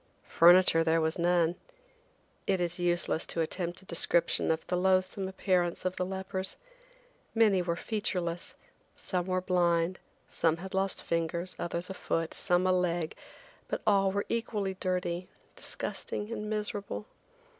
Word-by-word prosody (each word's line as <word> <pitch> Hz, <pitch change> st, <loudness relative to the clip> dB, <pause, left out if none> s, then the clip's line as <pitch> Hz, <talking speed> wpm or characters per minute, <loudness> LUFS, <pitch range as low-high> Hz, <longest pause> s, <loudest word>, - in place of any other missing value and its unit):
Furniture 175 Hz, -1 st, +6 dB
there 165 Hz, 0 st, +3 dB
was 160 Hz, +1 st, 0 dB
none. 170 Hz, -1 st, +3 dB, 0.9 s
It 190 Hz, -2 st, +2 dB
is 175 Hz, 0 st, -1 dB
useless 175 Hz, -2 st, +1 dB
to 165 Hz, -, 0 dB
attempt 175 Hz, +2 st, -3 dB
a -, -, -19 dB
description 170 Hz, -1 st, +2 dB
of 160 Hz, 0 st, 0 dB
the 180 Hz, -, -1 dB
loathsome 185 Hz, +1 st, +1 dB
appearance 185 Hz, -2 st, 0 dB
of 185 Hz, 0 st, 0 dB
the 180 Hz, -, 0 dB
lepers. 190 Hz, 0 st, -3 dB, 0.8 s
Many 210 Hz, -5 st, +4 dB
were 170 Hz, -1 st, -1 dB
featureless, 180 Hz, -4 st, -2 dB, 0.4 s
some 180 Hz, -1 st, -2 dB
were 185 Hz, 0 st, +1 dB
blind, 175 Hz, -1 st, +1 dB, 0.3 s
some 165 Hz, -1 st, +1 dB
had 190 Hz, +3 st, -8 dB
lost 195 Hz, 0 st, 0 dB
fingers, 170 Hz, +2 st, -1 dB
others 175 Hz, +1 st, -3 dB
a 190 Hz, -, -5 dB
foot, 165 Hz, -3 st, -2 dB
some 180 Hz, -1 st, +1 dB
a 185 Hz, -, +4 dB
leg, 175 Hz, -3 st, 0 dB, 0.5 s
but -, -, -3 dB
all 195 Hz, -1 st, +4 dB
were 200 Hz, +1 st, -1 dB
equally 215 Hz, -4 st, -1 dB
dirty, 180 Hz, -1 st, -2 dB, 0.3 s
disgusting 210 Hz, +2 st, -4 dB
and 210 Hz, -2 st, -4 dB
miserable. 210 Hz, -1 st, -2 dB
180 Hz, 145 wpm, -30 LUFS, 170-190 Hz, 0.9 s, Furniture